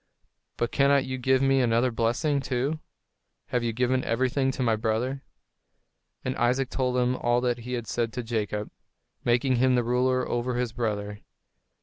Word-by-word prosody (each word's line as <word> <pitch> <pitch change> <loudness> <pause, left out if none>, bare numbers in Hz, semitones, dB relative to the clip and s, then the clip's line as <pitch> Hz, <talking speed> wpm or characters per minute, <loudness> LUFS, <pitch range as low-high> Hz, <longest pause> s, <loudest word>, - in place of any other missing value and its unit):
But 120 - -1
cannot 140 -1 +3
you 130 0 -4
give 130 +1 +2
me 135 0 +3
another 120 +1 +2
blessing, 120 +6 +1
too? 135 +4 -1 0.7
Have 125 -1 0
you 115 - 0
given 125 +2 +1
everything 130 +3 +1
to 130 - -2
my 115 -2 +3
brother?" 115 +5 -1 1.0
And 130 0 -1
Isaac 125 +2 +1
told 125 -1 0
him 125 0 +2
all 120 -1 +1
that 120 -1 0
he 125 +2 -6
had 120 -2 -3
said 115 +1 -1
to 125 - -3
Jacob, 105 -2 -3 0.5
making 125 +2 +2
him 130 +1 +3
the 120 - +2
ruler 125 +2 +1
over 120 +1 -1
his 120 -2 -1
brother. 105 -3 -3
125 Hz, 170 wpm, -27 LUFS, 115-130 Hz, 1.0 s, cannot